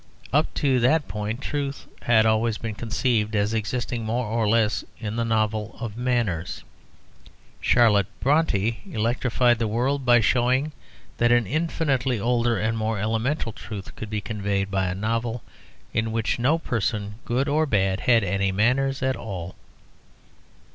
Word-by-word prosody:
Up - - +3
to 135 -3 +2
that 145 +5 +3
point 105 +5 -4
truth 140 -1 -3 0.2
had 110 -2 +4
always 110 0 +2
been 115 -2 -4
conceived 110 -1 0
as 100 +1 +1
existing 115 +2 -2
more 115 +3 -1
or 110 0 0
less 110 -1 +2
in 110 -1 -5
the 115 - 0
novel 110 -1 -1
of 110 -3 -5
manners. 115 -9 -1 1.0
Charlotte 105 -6 +4
Brontë 135 - +1
electrified 120 +1 +2
the 115 - 0
world 130 +6 0
by 120 -1 +5
showing 130 +6 +2 0.5
that 120 0 +3
an 120 -1 +4
infinitely 135 - 0
older 120 +1 +1
and 110 +2 -1
more 110 0 -1
elemental 115 +5 -1
truth 105 -2 -8
could 110 - -7
be 105 -1 -2
conveyed 100 -2 -2
by 95 -1 +1
a 90 - -2
novel 115 +3 -2 0.5
in 115 0 0
which 115 +1 -1
no 140 +7 +3
person, 105 -7 -2
good 125 +4 0
or 155 +2 +2
bad, 95 -5 +1
had 115 -3 +3
any 100 +1 0
manners 130 +7 +1
at 130 0 +1
all. 90 -4 -6
115 Hz, 150 wpm, -24 LUFS, 105-125 Hz, 1.0 s, by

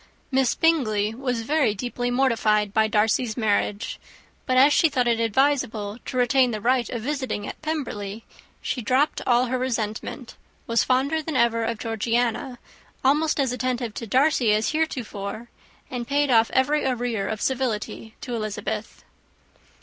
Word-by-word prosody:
Miss 265 -2 +2
Bingley 220 -11 +2
was 245 -1 -2
very 275 -4 +1
deeply 245 +3 -3
mortified 225 -5 +2
by 220 0 +3
Darcy's 220 +1 +1
marriage; 210 -1 -1 0.5
but 255 -1 +2
as 280 +3 +6
she 325 - +4
thought 255 -4 0
it 230 -1 +2
advisable 230 -3 0
to 255 - -4
retain 250 +1 +3
the 215 -2 -3
right 245 +2 +1
of 235 -3 -4
visiting 260 -6 -3
at - - -8
Pemberley, 230 -9 -4 0.4
she 250 - -2
dropped 260 +7 +1
all 245 0 +4
her 255 +1 -2
resentment; 230 0 -3 0.3
was 230 0 +2
fonder 275 +5 +1
than 315 -1 -5
ever 235 -2 +2
of 230 0 -2
Georgiana, 230 +3 -1 0.5
almost 300 +3 +2
as 265 -3 +1
attentive 250 -3 -2
to 230 - -6
Darcy 260 -1 +3
as 215 +1 +1
heretofore, 235 -8 -3 0.4
and 240 -2 -4
paid 285 -1 +1
off 225 -1 +5
every 290 +3 +2
arrear 245 -5 -1
of 215 - -3
civility 230 -3 -2
to 250 - -5
Elizabeth. 215 -1 -4
245 Hz, 150 wpm, -24 LUFS, 220-265 Hz, 0.5 s, as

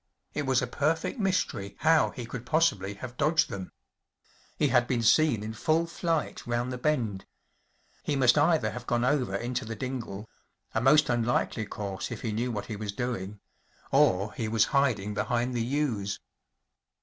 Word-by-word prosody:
It 145 -2 -2
was 130 -2 +3
a - - +1
perfect 160 - -1
mystery 140 - -1
how 160 0 +4
he 120 - -7
could 115 +1 -6
possibly 120 - +1
have 120 +3 -8
dodged 155 +2 +2
them. 95 -2 -6 0.9
He 150 - +2
had 120 -1 +3
been 120 -2 0
seen 125 -3 +4
in 110 +1 -5
full 160 +8 +1
flight 165 -4 -2
round 120 +1 -1
the 125 - -5
bend. 120 -9 -1 0.7
He 150 - -1
must 130 -3 +5
either 155 +2 +3
have 120 0 -8
gone 120 0 +1
over 125 -7 +1
into 120 +4 -2
the 115 +1 -5
dingle‚ÄĒa 115 -2 -6
most 150 +4 +6
un¬ 120 -1 +1
likely 115 -2 0
course 100 -3 -5
if - - -6
he 115 - -1
knew 120 +4 -1
what 105 -3 -4
he 110 - -5
was 105 0 -4
doing‚ÄĒ 105 -4 -4 0.5
or 95 +3 +3
he 115 - -3
was 110 0 +3
hiding 115 -8 +2
behind 120 +4 -1
the 120 - -1
yews. 120 -7 -1
120 Hz, 175 wpm, -28 LUFS, 110-145 Hz, 0.9 s, most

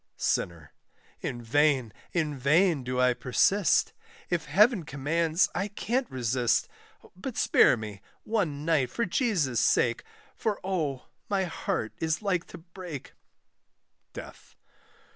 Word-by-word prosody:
SINNER. 80 -4 -2 0.5
In 120 -1 -5
vain, 135 -2 +2 0.2
in 155 -4 -1
vain, 150 +3 +3
do 125 0 -2
I 125 0 +4
persist, 180 +11 +2 0.4
If 175 -2 0
Heaven 205 - +4
commands 160 +4 +1
I 200 - -1
can't 240 +5 -2
resist; 120 -1 +1 0.5
But 220 +6 -6
spare 125 - +5 0.5
one 165 -10 -1
night 155 -6 +2
for 235 - -1
Jesus' 175 - +1
sake, 120 0 +2 0.3
For, 215 -3 -2
oh, 155 -9 -2 0.2
my 195 -2 +1
heart 160 -10 -3
is 160 +5 -1
like 180 -4 0
to - - -10
break; 170 -4 -9 1.0
DEATH. - - -11
160 Hz, 120 wpm, -28 LUFS, 130-190 Hz, 1.0 s, spare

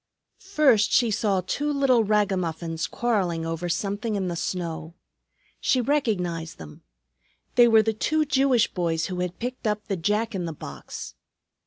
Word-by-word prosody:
First 290 - +3
she 235 -3 +3
saw 200 -2 +1
two 295 +9 -1
little 270 -5 +3
ragamuffins 180 -6 0
quarreling 185 -9 -1
over 165 +2 -3
something 205 +5 -2
in 190 -2 -1
the 175 - -3
snow. 165 -2 -4 0.6
She 260 - +2
recognized 185 - -1
them. 75 -2 -11 0.7
They 240 -1 +6
were 220 -1 +6
the 220 +1 0
two 310 +8 +1
Jewish 265 -4 +3
boys 165 -3 0
who 180 - -4
had 180 0 -3
picked 250 -1 -4
up 210 0 -1
the 200 - -1
Jack 210 +6 0
in 185 -3 -2
the 165 - -4
box. 70 - -8
205 Hz, 155 wpm, -25 LUFS, 170-240 Hz, 0.7 s, They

